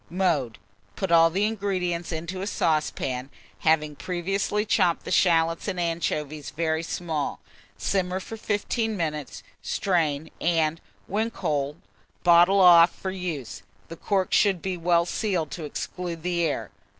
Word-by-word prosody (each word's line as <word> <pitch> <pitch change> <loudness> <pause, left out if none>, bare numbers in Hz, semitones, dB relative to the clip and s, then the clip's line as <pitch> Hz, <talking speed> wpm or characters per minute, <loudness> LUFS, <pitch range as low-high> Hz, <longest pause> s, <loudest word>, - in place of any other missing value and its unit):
Mode. 165 - 0 0.4
Put 190 -3 -3
all 165 0 +7
the 195 +5 +1
ingredients 185 -6 -2
into 170 +3 -4
a 195 - -3
saucepan, 140 -7 -1 0.3
having 155 -2 +2
previously 195 +5 -1
chopped 180 -5 +2
the - - -5
shalots 165 -1 +3
and 185 -3 -2
anchovies 155 -3 -2
very 160 0 -1
small; 165 -3 -3 0.4
simmer 185 -1 -1
for 225 - -8
15 220 +1 -1
minutes, 150 -5 -4 0.2
strain, 160 -5 0
and, 165 -1 +1 0.2
when 220 +4 -1
cold, 150 -9 -2 0.5
bottle 175 +3 +6
off 170 -1 +8
for 190 - -5
use: 165 - -5 0.3
the 165 - -7
corks 190 +2 0
should 195 -4 +3
be 190 +1 -3
well 170 0 +2
sealed 180 -5 -1
to 165 - -5
exclude 170 +2 -5
the 175 -1 0
air. 120 -8 -2
170 Hz, 140 wpm, -25 LUFS, 160-190 Hz, 0.5 s, off